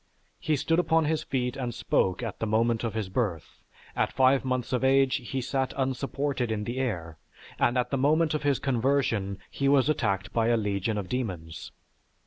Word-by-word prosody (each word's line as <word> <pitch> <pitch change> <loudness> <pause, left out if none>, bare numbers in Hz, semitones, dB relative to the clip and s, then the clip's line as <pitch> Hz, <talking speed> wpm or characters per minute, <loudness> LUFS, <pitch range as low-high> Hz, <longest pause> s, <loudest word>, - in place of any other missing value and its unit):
He 155 - +1
stood 165 +4 +1
upon 165 -2 +2
his 155 0 0
feet 125 -4 -2
and 125 -4 -4
spoke 95 -3 0
at 115 - -5
the 115 - -1
moment 115 +2 +1
of 115 -2 -3
his 110 -3 -2
birth; 95 -5 -3 0.3
at - - +1
five 130 +1 +3
months 130 -1 -2
of 125 - 0
age 135 0 +4
he 130 0 -4
sat 130 +1 -2
unsupported 135 -1 -1
in 105 -1 -2
the 120 +4 -4
air; 85 -11 -3 0.4
and 120 - +2
at 125 -1 0
the 135 - 0
moment 155 +3 +3
of 155 - -1
his 145 -3 +2
conversion 120 -6 0
he 140 0 0
was 140 0 +4
attacked 100 -10 -1
by 115 -1 +2
a 120 0 +3
legion 105 0 -1
of 100 -3 -3
demons. 90 -9 -4
125 Hz, 190 wpm, -27 LUFS, 110-135 Hz, 0.4 s, age